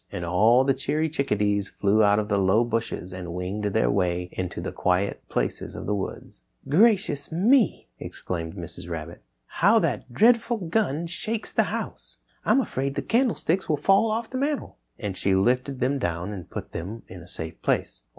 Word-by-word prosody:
And 85 - -4
all 110 +9 +4
the 135 0 +3
cheery 145 +4 -1
little 155 - -13
Chick 140 0 0
a - - +3
dees 100 -1 0
flew 105 +2 +2
out 105 -1 +5
of 105 -1 0
the 100 -1 +1
low 95 +4 +4
bushes 115 -6 -3
and 90 -2 -6
winged 95 +4 -3
their 60 -12 +2
way 90 +1 0
into 90 -1 -4
the - - -4
quiet 95 +2 0
places - - -2
of - - -6
the 105 - 0
wood. 100 -2 -5 0.3
"Gracious 190 - +3
me!" 220 +9 +3
exclaimed 85 -1 -5
Mrs. 85 -1 -8
Rabbit, 85 0 -6 0.2
"how - - +3
that - - -1
dreadful 235 - +4
gun 170 -4 0
shakes 215 +6 -4
the - - +3
house. - - -6 0.2
I'm 270 - +4
afraid 135 - -3
the - - -2
candlesticks 225 -7 +1
will 150 - +2
fall 195 +8 +4
off 225 +1 -2
the 255 - -2
mantel," 285 - -2 0.2
and 100 -3 -4
she 95 0 +1
lifted 125 +6 +1
them 135 +2 +1
down 85 -1 -2
and 90 -4 -8
put - - -7
them 100 +7 -6
in 90 -1 -10
a 85 - -13
safe 80 -2 -7
place. - - -1
110 Hz, 190 wpm, -25 LUFS, -, 0.3 s, out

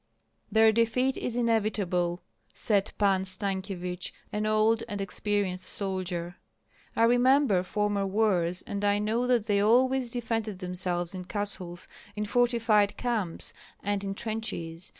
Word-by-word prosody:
"Their 220 +1 +6
defeat 230 +4 +2
is 235 - -3
inevitable!" 205 -7 +1 0.3
said 205 -2 +1
Pan 195 -2 +3
Stankyevich, 190 -2 -3 0.2
an 210 0 0
old 215 +1 +3
and 205 -2 -4
experienced 195 -1 -2
soldier. 185 -2 -3 0.6
"I 230 - +3
remember 245 -3 +4
former 200 +1 0
wars, 185 -4 +1
and 200 0 -4
I 205 0 +3
know 220 +4 0
that 240 -4 +2
they 205 -2 +2
always 255 +3 +3
defended 225 -4 -2
themselves 180 -1 -2
in 185 -1 -6
castles, 185 -4 -4 0.3
in 210 0 -2
fortified 225 -2 +2
camps, 220 -9 -2 0.3
and 205 0 -1
in 195 0 -3
trenches. 185 -7 -4
205 Hz, 130 wpm, -28 LUFS, 185-225 Hz, 0.6 s, Their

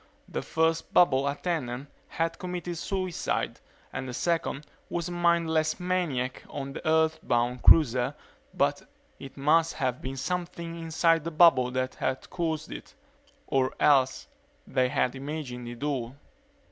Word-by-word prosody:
The - - -3
first 160 0 0
bubble 140 -5 +5
attendant 140 -4 -2 0.2
had 165 0 -2
committed 180 -1 -4
suicide 185 -2 -2 0.3
and 130 - -4
the 125 - -5
second 165 -3 -1 0.2
was 170 -1 -2
a - - -6
mindless 170 -2 +2
maniac 170 -9 -1
on 135 -1 -5
the - - -6
Earthbound 155 -7 +1
cruiser 125 -6 +5 0.4
but - - +1 0.4
it 135 0 -10
must 155 +4 +3
have 130 -4 -1
been 135 +1 -5
something 170 +2 -4
inside 165 0 +2
the 165 - -3
bubble 155 -6 +5
that 130 0 -2
had 130 0 -3
caused 160 -3 -2
it. - - -9 0.5
Or 135 -3 0
else 130 -3 +3 0.4
they 130 -1 +1
had 125 0 +1
imagined 135 -3 -5
it 120 +3 -7
all. 130 -4 -2
150 Hz, 135 wpm, -28 LUFS, 130-165 Hz, 0.5 s, bubble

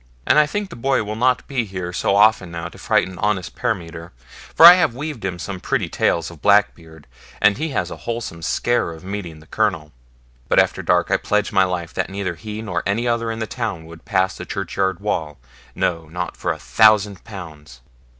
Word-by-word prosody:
And - - +5
I 150 - +4
think 205 +4 -4
the - - -8
boy 130 0 0
will 105 +1 -5
not 125 +2 +1
be 130 -4 -1
here 95 -4 -6
so 100 - +1
often 105 -3 +4
now 85 0 -6
to - - -15
frighten 95 -1 0
honest 100 -4 -1
Parmiter, 85 -8 -4 0.4
for 165 - +8
I 175 - +13
have 175 -10 +1
weaved 145 -4 -6
him 95 -2 -3
some 95 +2 -6
pretty - - -1
tales 85 0 0
of 80 -4 -15
Blackbeard, 85 -7 +1 0.3
and 105 +3 +3
he 160 +1 -2
has 135 - -2
a - - -7
wholesome 115 -8 -5
scare 120 0 0
of 80 - -13
meeting 90 -5 -6
the - - -17
Colonel. 85 -6 -1 0.6
But - - +2
after - - +3
dark - - +1
I - - +4
pledge 105 -1 -1
my 95 -2 +4
life 90 -2 -4
that - - -2
neither 100 -2 -3
he 105 +6 -7
nor 90 -5 -2
any 115 +5 -1
other 115 -1 0
in 115 - -3
the 110 - -2
town 110 -9 -4
would 80 0 -13
pass 95 -2 0
the - - -7
churchyard 95 -1 -2
wall, 80 -8 -2 0.4
no, 85 -2 -1
not 90 +3 -5
for - - -2
a - - -4
thousand 105 -2 +3
pounds.' 75 - -11
100 Hz, 210 wpm, -21 LUFS, 85-110 Hz, 0.6 s, I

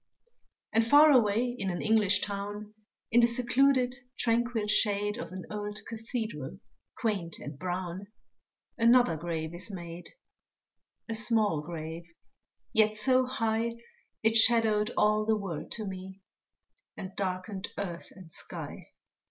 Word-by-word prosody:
And 225 +1 +4
far 290 +6 +7
away 240 -1 +3
in 195 - -1
an 175 - -3
English 210 -3 +3
town, 205 +1 -5 0.4
In 240 +1 +6
the 235 - +6
secluded, 250 +2 +3 0.2
tranquil 235 -1 +1
shade 210 +1 +1
Of - - -6
an 185 0 -7
old 210 0 -4
Cathedral 225 - -5 0.4
quaint 195 -8 -2
and 145 -1 -8
brown, 185 +1 -4 0.7
Another 235 -6 +5
grave 160 0 -4
is 175 +4 -7
made 175 -3 -8 1.0
A 225 - -3
small 215 -7 +1
grave, 165 +1 -7 0.6
yet 215 -1 +3
so 255 +3 +3
high 230 -2 0 0.5
It 225 +1 +4
shadowed 220 -2 +5
all 215 0 +3
the 220 0 +2
world 170 -7 -5
to 220 - -5
me, 190 0 -7 0.8
And 190 0 -7
darkened 190 +1 -3
earth 180 -4 -5
and 185 -4 -13
sky. - - -7
210 Hz, 125 wpm, -30 LUFS, 185-230 Hz, 1.0 s, far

